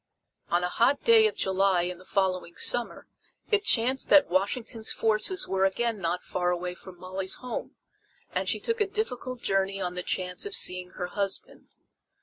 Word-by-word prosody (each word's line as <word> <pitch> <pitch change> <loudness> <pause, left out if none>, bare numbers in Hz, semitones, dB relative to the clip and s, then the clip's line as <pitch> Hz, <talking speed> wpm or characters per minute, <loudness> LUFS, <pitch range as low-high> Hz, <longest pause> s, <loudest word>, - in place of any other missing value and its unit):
On 175 +1 +1
a - - +1
hot 250 +9 +1
day 450 -2 +6
of 435 - -4
July 190 -2 +2
in 180 0 -3
the 185 - -16
following 185 -3 -1
summer 240 -1 +1 0.5
it 420 -1 +3
chanced 255 - +2
that 290 -11 +6
Washington's 220 +4 -1
forces 225 - 0
were 190 0 0
again 225 +3 0
not 175 0 -2
far 180 -1 -1
away 180 0 -2
from 180 0 -13
Molly's 185 +1 -4
home, 250 -1 -6 0.6
and - - -1
she - - 0
took 460 -1 -2
a 415 - +2
difficult 255 - -4
journey 195 0 0
on 180 -2 -3
the 180 - -4
chance 180 0 -3
of 410 -1 -1
seeing 180 0 +3
her 180 - -4
husband. 195 +1 -3
195 Hz, 175 wpm, -27 LUFS, 180-250 Hz, 0.6 s, day